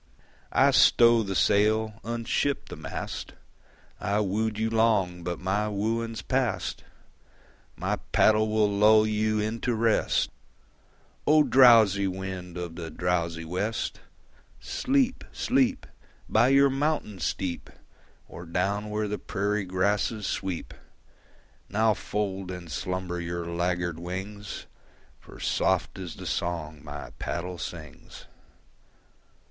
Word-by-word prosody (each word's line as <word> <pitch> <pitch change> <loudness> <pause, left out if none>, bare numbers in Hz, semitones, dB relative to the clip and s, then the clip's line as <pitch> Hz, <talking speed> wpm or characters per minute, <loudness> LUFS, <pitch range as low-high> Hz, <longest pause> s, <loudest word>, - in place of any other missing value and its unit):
I - - +5
stow 120 -1 +6
the 100 -3 -3
sail, 110 +2 +2
unship 120 +5 -1
the - - -6
mast: - - -6 0.7
I 100 +1 0
wooed 105 +2 -1
you 110 +1 0
long 100 -6 +2
but 85 0 -3
my 100 +3 0
wooing's 115 +2 -2
past; - - -1 0.9
My - - -1
paddle 110 0 +4
will 110 -1 +3
lull 105 +2 +5
you 110 0 0
into 115 +3 -1
rest. 115 0 +1 1.0
O! 155 0 +6
drowsy 115 -8 +6
wind 95 -1 -5
of 85 -2 -6
the 85 -2 -5
drowsy 85 0 -1
west, 100 +7 -2 0.6
Sleep, 265 -1 0
sleep, 260 +1 +1 0.4
By 110 +3 +4
your 140 +1 +5
mountain 135 -8 -1
steep, 90 0 -3 0.6
Or 85 0 -10
down 100 +5 -1
where 105 0 -1
the 105 0 -3
prairie 105 0 -1
grasses 100 +3 0
sweep! 95 -4 -3 1.0
Now 110 +2 +3
fold 100 -3 -3
in 90 -2 -7
slumber 90 +1 -3
your 85 0 -4
laggard 85 -1 -1
wings, 95 +4 -6 0.5
For - - -14
soft - - 0
is 90 -4 -6
the 95 - -9
song 80 -4 -3
my 75 -4 -8
paddle 90 0 -4
sings. 80 -5 -9
100 Hz, 115 wpm, -27 LUFS, 90-110 Hz, 1.0 s, stow